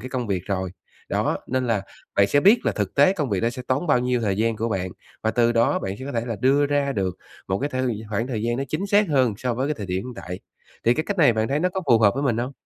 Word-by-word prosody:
cái 130 - -7
công 125 -3 -3
việc 95 -4 -1
rồi. 95 -2 -2 0.4
Đó, - - 0
nên 130 0 -1
là 110 -4 +1 0.3
bạn 100 - +5
sẽ 145 +7 +3
biết 205 - +5
là 115 - +2
thực 100 -2 -3
tế 145 +7 +5
công 150 - -2
việc 95 - 0
đó 115 - +1
sẽ 125 0 -7
tốn 140 +7 0
bao 145 -4 +4
nhiêu 125 -1 0
thời 100 -3 0
gian 115 0 +1
của 115 +2 -1
bạn, 95 -3 -2 0.3
và 110 - +1
từ 120 0 +2
đó 115 0 +2
bạn 95 +1 -4
sẽ 130 - -7
có 140 - -5
thể 115 0 -2
là 115 -3 -3
đưa 140 +2 +3
ra 140 -1 0
được 95 -5 -2 0.3
một 95 +1 0
cái 145 +1 -2
thời 125 -4 -2
khoảng 115 +4 -1
thời 115 -5 -3
gian 120 +1 0
nó 135 - -2
chính 185 +8 -2
xác 205 -1 +3
hơn 130 -7 +2
so 125 -2 -1
với 130 +4 -1
cái 150 - 0
thời 105 -5 -6
điểm 95 +4 -2
hiện 125 -1 -7
tại. 90 -3 -7 0.4
Thì 120 +1 +4
cái 155 - -1
cách 205 - -3
này 140 -7 +6
bạn 110 0 0
thấy 145 +3 0
nó 180 - +2
có 190 +1 -3
phù 115 -3 +5
hợp 105 0 +4
với 140 - -2
mình 120 -5 +1
hông? 125 +3 -2
120 Hz, 310 wpm, -23 LUFS, 110-140 Hz, 0.4 s, này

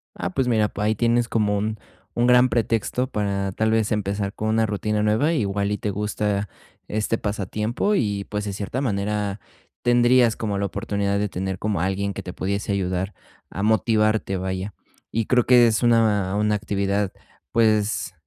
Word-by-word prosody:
Ah, - - -3
pues 125 +7 0
mira, 110 -3 +2
pues 105 0 -3
ahí 110 - +2
tienes 120 +2 +1
como 105 -3 +1
un 110 +2 -2 0.4
un 120 - +2
gran 125 +1 +6
pretexto 115 +1 0
para 100 -4 -2
tal 110 +3 0
vez 110 -1 +1
empezar 100 -1 -2
con 110 - -3
una 110 0 +2
rutina 105 0 -1
nueva. 110 +9 +2
Igual 100 -7 0
y 105 - -1
te 105 - -2
gusta 105 0 -1 0.4
este 110 +2 -1
pasatiempo 105 - -1
y, 100 - 0
pues, 105 0 -4
de 100 - -3
cierta 100 +6 -4
manera 105 -4 -1 0.4
tendrías 120 -1 +4
como 105 -3 -2
la 100 - 0
oportunidad 100 +1 -1
de 105 - 0
tener 95 0 -4
como 105 -5 -1
alguien 95 +2 -1
que - - -7
te 90 - -6
pudiese 100 +2 -2
ayudar 95 0 -2 0.3
a 100 - -5
motivarte, 110 -1 +2
vaya. 95 +1 -4 0.4
Y 115 -1 0
creo 125 -2 +3
que 120 -2 +6
es 110 +1 0
una 110 -5 +3
una 105 0 +1
actividad, 100 -1 -1 0.4
pues, 110 -3 +2
105 Hz, 175 wpm, -23 LUFS, 100-115 Hz, 0.4 s, gran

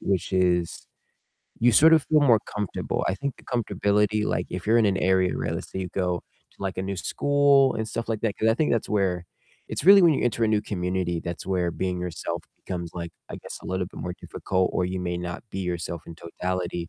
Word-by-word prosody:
which 95 -2 -1
is 90 -2 +1 0.7
you 120 +1 +5
sort 160 +7 +7
of 160 -3 +5
feel 155 -1 +5
more 120 -7 +5
comfortable. 105 -3 -2
I 95 - +1
think 140 +6 -3
the - - -18
comfortability, 105 -3 +1
like - - -1
if 90 +1 -5
you're 115 +2 +5
in 110 - +4
an 100 -2 +2
area 95 0 +2
where - - -2
let's - - -6
say 95 - -3
you 95 - -3
go 90 -2 0 0.3
to, - - -29
like, 95 -1 -3
a - - -1
new 95 0 -3
school 140 +5 +3
and 110 - -2
stuff 115 +1 -4
like 110 -2 -1
that, 110 -2 0
'cause 110 - +2
I 110 - +4
think 150 +5 +1
that's 115 - 0
where 95 -4 0 0.4
it's - - -4
really 195 +1 +9
when 165 -3 +6
you - - 0
enter 120 -1 +1
a - - +2
new 105 -1 +2
community, 90 -3 -2
that's 85 0 -6
where 90 -2 0
being 90 +1 -2
yourself 90 -2 -4
becomes, 85 -2 -5
like, 85 -1 -5 0.2
I - - -5
guess, - - -9
a - - -9
little 95 0 -2
bit - - -11
more 90 0 -4
difficult, 95 -1 -1
or 90 - +1
you 90 +1 -3
may 90 -1 -2
not 90 0 -5
be 95 - -5
yourself 85 -2 -3
in 85 - -9
totality 85 0 -4
95 Hz, 235 wpm, -25 LUFS, 90-110 Hz, 0.7 s, really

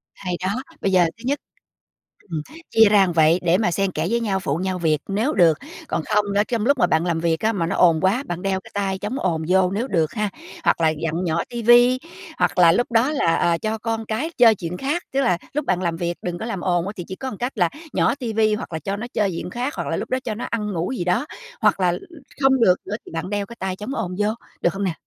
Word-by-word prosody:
Hay 180 -2 -4
đó, 200 +7 -1 0.2
bây 195 - +1
giờ 180 -2 +5
thứ 230 - -15
nhất 285 +3 0 0.9
ừm, 160 -2 -2 0.3
chia 225 -2 +6
ra 200 -2 +5
vậy 160 +2 +5
để 175 +1 +4
mà 200 -4 +1
xen 195 +3 0
kẽ 155 -1 -2
với 235 +2 +1
nhau, 205 -4 0
phụ 155 -6 -1
nhau 185 +1 -2
việc 160 -3 +2
nếu 215 +9 0
được, 165 -5 +4 0.3
còn - - -1
không 210 -1 +2
nữa 200 - +3
trong 230 -3 -1
lúc 280 +2 +3
mà 180 -7 +3
bạn 160 0 +1
làm 170 -2 0
việc 165 -1 +1
á 220 +1 +1
mà 180 -5 -1
nó 185 - -1
ồn 165 -3 +4
quá, 205 +8 +2
bạn 175 0 -4
đeo 195 0 0
cái - - -16
tai 195 -1 -1
chống 210 +8 -4
ồn 165 -4 0
vô 185 0 +3
nếu 220 +6 -1
được 165 - 0
ha, 210 -2 -1 0.3
hoặc - - +2
là 160 -1 +3
vặn 165 +2 -1
nhỏ 170 -1 0
ti 240 -1 -4
vi, 240 +2 +6 0.4
hoặc - - +1
là 170 -2 +7
lúc 240 +8 0
đó 235 +5 +3
là, 220 - +2
à, 170 0 +2
cho 220 +4 -2
con 225 0 -3
cái 255 +10 -2
chơi 230 -3 +7
chuyện 180 -1 -5
khác. 295 - -2
Tức 270 - 0
là 240 -10 +2 0.2
lúc 300 0 -1
bạn 185 - 0
làm 170 -2 -1
việc 170 0 -2
đừng 175 -1 -3
có - - -4
làm 200 -6 -4
ồn 175 -2 +1
á 200 - -4
thì 180 - -5
chỉ 190 - -6
có 265 - -6
một 210 - -8
cách 245 +2 -4
là 175 -4 +3 0.2
nhỏ 235 - +2
ti 245 -5 -4
vi, 215 -1 +3
hoặc 210 - -7
là 160 - -2
cho 195 +6 -3
nó 230 +3 -5
chơi 210 -2 +1
chuyện 175 0 -5
khác, 245 +8 -3
hoặc - - -4
là - - -1
lúc - - -4
đó 255 - +1
cho 220 -3 -3
nó 230 - -5
ăn 210 -3 -2
ngủ 170 +4 -2
gì 175 - -1
đó, 180 +10 +1 0.4
hoặc - - +3
là 180 -2 +2 0.5
không 265 -2 +4
được 180 -5 +6
nữa 210 - -3
thì - - -11
bạn 165 +2 -4
đeo 205 0 -1
cái 235 - -11
tai 190 -1 -2
chống 210 +8 -5
ồn 180 0 -3
vô, 210 +1 +2 0.3
được - - +3
không 195 +1 -3
nè? 185 -3 0
195 Hz, 280 wpm, -22 LUFS, 175-225 Hz, 0.9 s, là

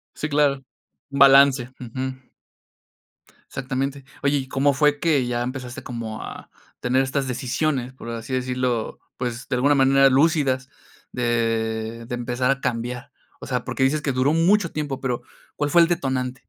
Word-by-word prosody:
Sí, 150 - -3
claro. 145 -2 +2 0.5
Un 140 - -4
balance, 135 -2 +6
ujú. 130 +1 -6 1.2
Exactamente. 135 +1 -3 0.2
Oye, 140 +1 +2
¿y 135 -1 -2
cómo 140 +1 +2
fue 145 0 +2
que 145 -7 +2
ya 120 0 -1
empezaste 125 -1 -5
como 115 -2 -6
a - - -9 0.3
tener 130 +2 +2
estas 135 0 -1
decisiones, 130 +1 -1
por 125 -2 -11
así 115 +2 -6
decirlo, 125 -2 -1 0.2
pues 125 0 -4
de 125 - 0
alguna 140 +3 +3
manera 135 0 +5
lúcidas, 135 -2 +2 0.4
de 115 -1 -1
de 120 - -4
empezar 125 +2 0
a 135 - -4
cambiar? 125 0 -3 0.3
O - - -8
sea, - - -1
porque 130 - -3
dices 150 +3 +2
que 140 - 0
duró 130 +4 +2
mucho 175 +2 +3
tiempo, 145 -3 -4
pero, 125 -3 -2 0.3
¿cuál 145 -1 0
fue 170 +3 +6
el 165 - +4
detonante? 130 -7 -1
130 Hz, 160 wpm, -23 LUFS, 125-140 Hz, 1.2 s, balance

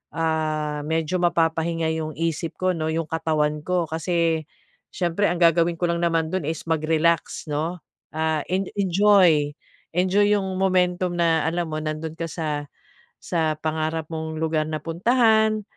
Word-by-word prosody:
ah, 155 -2 -1
medyo 160 +3 0
mapapahinga 165 -1 +1
yung 155 0 -4
isip 165 -1 -2
ko 185 0 +1
'no 160 -1 -2
'yong 165 0 -1
katawan 150 -2 0
ko, 180 -2 +1
kasi 165 -1 0 0.5
siyempre 180 +3 +1
ang 175 0 -2
gagawin 170 0 +4
ko 175 - 0
lang 170 - -1
naman 165 -2 +1
do'n 185 -5 -2
is 160 -1 -3
mag-relax, 160 +1 +1
'no? 165 +4 -2 0.4
Ah, 160 -1 0
en 190 +2 +1 0.2
enjoy! 185 -6 +4 0.4
Enjoy 190 +3 +3
'yong 190 -2 0
momentum 180 -1 +1
na 165 -2 +3
alam 170 0 -1
mo, 155 0 -3
nando'n 155 +1 -4
ka 165 - -3
sa, 150 -3 -3 0.6
sa 160 -3 -1
pangarap 160 0 -2
mong 160 0 -4
lugar 160 -1 0
na 155 -1 -3
puntahan. 220 +4 +3
165 Hz, 150 wpm, -23 LUFS, 155-180 Hz, 0.6 s, gagawin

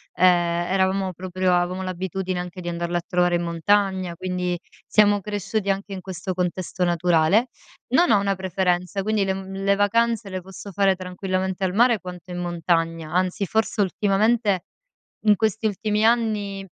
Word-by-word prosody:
ehm, - - +3
eravamo 185 +2 +2
proprio 185 +1 -1
avevamo 180 +1 0
l'abitudine 185 0 -3
anche 180 +1 -6
di 175 - -8
andarlo 170 0 -2
a - - -2
trovare 175 -2 +2
in 175 - 0
montagna, 185 +1 +1
quindi 180 -1 -2 0.3
siamo 205 -1 +4
cresciuti 205 0 -3
anche 195 +1 -2
in 185 - -6
questo 185 0 -5
contesto 180 0 -2
naturale. 175 +5 +3 0.5
Non 345 +6 +5
ho 205 - +5
una 200 -1 0
preferenza, 185 0 -1
quindi 215 0 +1
le 190 0 0
mhmm, 195 0 -6
le 200 0 +3
vacanze 225 +1 +1
le 185 -1 -4
posso 190 +2 -10
fare 195 0 +2
tranquillamente 185 +1 -3
al 185 -1 0
mare 235 0 +4
quanto 180 -1 -9
in 175 - -5
montagna, 165 -2 -1
anzi 185 +2 0
forse 220 +2 -1
ultimamente 205 +1 +1 0.6
in 210 - +6
questi 220 +1 0
ultimi 210 +1 0
anni 210 -4 0
190 Hz, 160 wpm, -23 LUFS, 180-205 Hz, 0.6 s, in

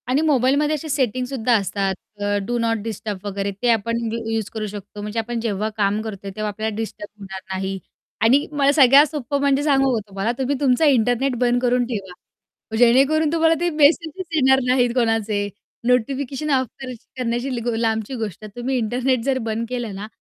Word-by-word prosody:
आणि 265 +4 +2
मोबाईलमध्ये 295 0 +2
असे 310 +1 -6
सेटिंगसुद्धा 255 -2 0
असतात 195 -1 -1 0.3
अ, 205 0 +1
डू 240 +3 -1
नॉट 230 -1 +1
डिस्टर्ब 215 -2 -5
वगैरे 200 0 -2
ते 245 - +2
आपण 230 +1 +1 0.2
यू 230 - -2
यूज 220 -2 -2
करू 220 -1 -3
शकतो 205 0 -8
म्हणजे 210 +2 -3
आपण 235 +1 -3
जेव्हा 215 -2 -1
काम 205 +1 +1
करतोय, 200 -3 -6
तेव्हा 215 0 -2
आपल्याला 215 +1 -3
डिस्टर्ब 215 -1 -5
होणार 190 -1 -8
नाही. 190 0 -3 0.4
आणि 255 +6 +4
मला 285 -1 +3
सगळ्यात 280 0 +7
सोप्पं 285 -2 -2
म्हणजे 280 0 +2
सांगू 270 -3 +3
का - - 0
तुम्हाला 195 +3 -1
तुम्ही 270 +2 0
तुमचा 270 +2 +3
इंटरनेट 250 -1 +2
बंद 245 0 +2
करून 250 0 +2
ठेवा. 200 -6 -5 0.6
जेणेकरून 270 +6 +4
तुम्हाला 325 0 +4
ते 345 0 +1
मेसेज 315 +3 +2
येणार 265 -3 +5
नाहीत 250 -1 +3
कोणाचे, 225 -4 +1 0.4
नोटिफिकेशन 265 +4 0
ऑफ 260 -2 +2
करण्या 255 -2 -6 0.3
करण्याची 240 -1 -2
लांबची 220 +2 -1
गोष्ट 220 -4 -5
आहे. 215 - -8
तुम्ही 260 +2 -1
इंटरनेट 250 +3 0
जर 270 0 +1
बंद 225 +1 -2
केलं 240 -5 -4
ना, 200 +2 -6
240 Hz, 180 wpm, -21 LUFS, 215-270 Hz, 0.6 s, सगळ्यात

